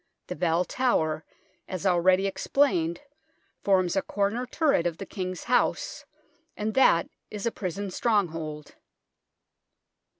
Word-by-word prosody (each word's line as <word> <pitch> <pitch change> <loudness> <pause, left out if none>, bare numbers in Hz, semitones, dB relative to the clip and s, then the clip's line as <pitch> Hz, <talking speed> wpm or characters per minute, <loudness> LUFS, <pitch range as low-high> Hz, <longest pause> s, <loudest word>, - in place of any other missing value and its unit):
The - - -5
Bell 175 0 +1
Tower, 160 -13 0 0.4
as 185 0 -5
already 185 +1 +4
explained, 190 - +1 0.6
forms 185 -3 +2
a 195 - +2
corner 205 +7 -1
turret 275 - +2
of 165 -2 -4
the 195 - -6
King's 185 -2 -5
House, 245 - 0 0.5
and 215 +1 -2
that 170 -10 +4 0.2
is 210 0 -6
a 230 - +1
prison 195 0 -4
stronghold. 165 -9 -1
185 Hz, 120 wpm, -27 LUFS, 170-210 Hz, 0.6 s, already